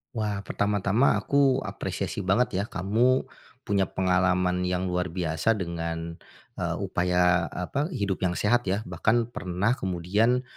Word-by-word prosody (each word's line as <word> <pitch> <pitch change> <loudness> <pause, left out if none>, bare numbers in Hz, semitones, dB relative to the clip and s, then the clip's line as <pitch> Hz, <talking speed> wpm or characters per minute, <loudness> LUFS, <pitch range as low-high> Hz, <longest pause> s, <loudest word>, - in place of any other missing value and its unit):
Wah, 105 -2 -2
pertama-tama 105 +4 +1
aku 135 -2 +2
apresiasi - - -4
banget 95 +1 +1
ya 100 - -1
kamu, 115 +8 +2 0.4
punya 100 -2 +1
pengalaman 90 -1 +1
yang 90 0 -1
luar 90 0 -1
biasa 85 +5 0
dengan, 85 -2 -4 0.4
eee, - - -1
upaya 90 -1 +1
apa, 140 - -3
hidup 100 -4 -1
yang 90 -2 0
sehat 120 +1 +1
ya, 100 +4 0
bahkan 115 +1 +1
pernah 90 +4 -1
kemudian, 105 +5 +1
95 Hz, 130 wpm, -26 LUFS, 90-110 Hz, 0.4 s, aku